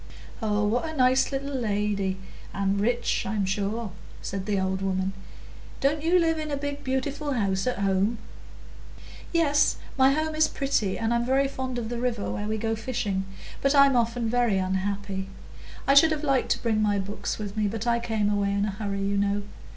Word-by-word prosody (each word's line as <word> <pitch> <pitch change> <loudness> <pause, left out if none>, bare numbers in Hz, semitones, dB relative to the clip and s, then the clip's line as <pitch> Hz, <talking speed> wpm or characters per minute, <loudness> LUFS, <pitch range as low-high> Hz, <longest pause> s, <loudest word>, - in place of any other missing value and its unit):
"Oh, 210 -1 +1
what 245 +9 0
a 315 - -7
nice 255 +1 +4
little 275 +1 -3
lady!—and 200 -3 -2
rich, 240 +3 +1
I'm 200 0 -1
sure," 205 +3 -2 0.3
said 195 0 -5
the 205 -2 +1
old 190 0 -1
woman. 190 0 -1 0.7
"Didn't 290 +2 +1
you 335 +3 +3
live 325 -2 +2
in 310 0 -4
a 285 - -1
beautiful 285 0 -2
house 195 -3 0
at 250 - 0
home?" 200 +3 +1 1.1
"Yes, 300 -3 +3 0.2
my 265 +1 +6
home 310 +1 -1
is 310 0 +4
pretty, 245 -9 0
and 225 +1 0
I'm 235 0 +1
very 265 +3 +2
fond 260 -2 -4
of 225 -2 -3
the 240 -1 -3
river, 240 -4 -1
where 205 - -3
we 220 +1 -1
go 225 +1 -1
fishing, 215 -5 -2 0.4
but 275 +1 +3
I'm 275 -1 +6
often 235 0 +1
very 235 -3 +2
unhappy. 190 +1 -2 0.6
I 275 - +4
should 290 +3 +8
have 310 -1 -2
liked 275 -3 +1
to - - -9
bring 220 -2 +2
my 205 -1 +2
books 200 +1 -3
with 205 -1 -5
me, 215 -1 +1
but 220 +2 -3
I 235 0 +2
came 220 -3 0
away 200 -1 +1
in 200 0 +1
a 210 - -1
hurry, 200 -1 -3
you 200 0 0
know. 200 0 +1
225 Hz, 190 wpm, -26 LUFS, 200-265 Hz, 1.1 s, should